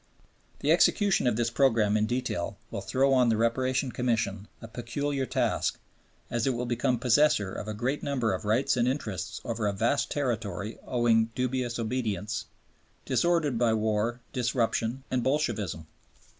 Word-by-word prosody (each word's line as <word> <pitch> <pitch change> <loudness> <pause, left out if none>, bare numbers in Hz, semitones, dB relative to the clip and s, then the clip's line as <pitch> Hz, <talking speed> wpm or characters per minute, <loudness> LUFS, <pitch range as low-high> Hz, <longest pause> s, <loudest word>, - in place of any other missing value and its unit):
The - - +2
execution 200 - +3
of 120 - +2
this 115 0 0
program 115 -5 +3
in 110 0 +2
detail 120 -7 -2
will - - -4
throw 130 +8 +2
on 125 -2 +4
the 110 - +2
Reparation 130 +3 +1
Commission 115 -5 -1
a 115 - -9
peculiar 130 +4 -3
task, - - 0 0.5
as 120 +1 0
it 130 - +1
will 120 +1 -2
become 125 +1 0
possessor 120 -5 +3
of - - -6
a 110 - -4
great 130 +7 -1
number 125 -7 0
of 95 - -4
rights 120 +7 +2
and 120 0 +2
interests 110 - -3
over 115 -2 -1
a 100 - 0
vast 115 +8 +1
territory 110 -6 -3
owing 120 -2 +3
dubious 125 -1 -1
obedience, 110 -3 -2 0.6
disordered 165 -8 +1
by 115 -2 +3
war, 110 +2 0
disruption, 120 0 0
and 130 -1 +1
Bolshevism. 115 - -1
120 Hz, 155 wpm, -28 LUFS, 110-130 Hz, 0.6 s, on